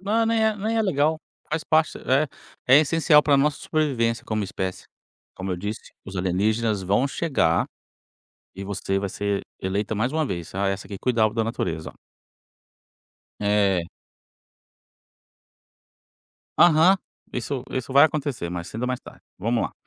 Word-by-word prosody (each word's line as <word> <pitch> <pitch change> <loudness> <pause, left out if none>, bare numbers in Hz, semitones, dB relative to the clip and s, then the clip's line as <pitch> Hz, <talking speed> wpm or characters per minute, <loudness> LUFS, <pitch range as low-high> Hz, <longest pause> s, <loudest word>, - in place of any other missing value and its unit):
Não, 215 +4 +1
nem 225 -1 +2
é 220 -1 +2
nem 220 +3 -1
é 225 - +3
legal. 155 -4 +1 0.3
Faz 155 0 -2
parte, 155 0 +2
é 140 +3 +1 0.5
é - - +9
essencial 155 -1 +4
pra 145 -2 +4
nossa 145 +1 +2
sobrevivência 130 -7 0
como 110 -1 -1
espécie, 95 -1 -4 0.5
como 95 +1 -5
eu - - -2
disse, 105 +4 -6
os 95 -1 -8
alienígenas 105 +4 0
vão 100 +9 +2
chegar, 160 0 +1 0.9
e 100 - -6
você 95 0 -2
vai 100 0 -3
ser 100 +1 -2 0.2
eleita 100 +3 -1
mais 115 +5 0
uma 155 0 0
vez: 85 - -5
"Ah, 100 +1 0
essa 95 0 -3
aqui 100 0 -6
cuidava 110 -4 +2
da 115 -1 +1
natureza, 85 -8 -3
ó". - - -27 1.4
É. 100 -4 +2 2.7
Aham, 175 +3 +6 0.4
isso 125 +2 -3
isso 130 0 -4
vai 140 +2 +8
acontecer, 145 - -1
mais 85 -1 -5
cedo 115 - -6
ou 125 - 0
mais 125 - -1
tarde. - - -14 0.2
Vamos 115 +4 0
lá - - -3
115 Hz, 155 wpm, -24 LUFS, 100-155 Hz, 2.7 s, é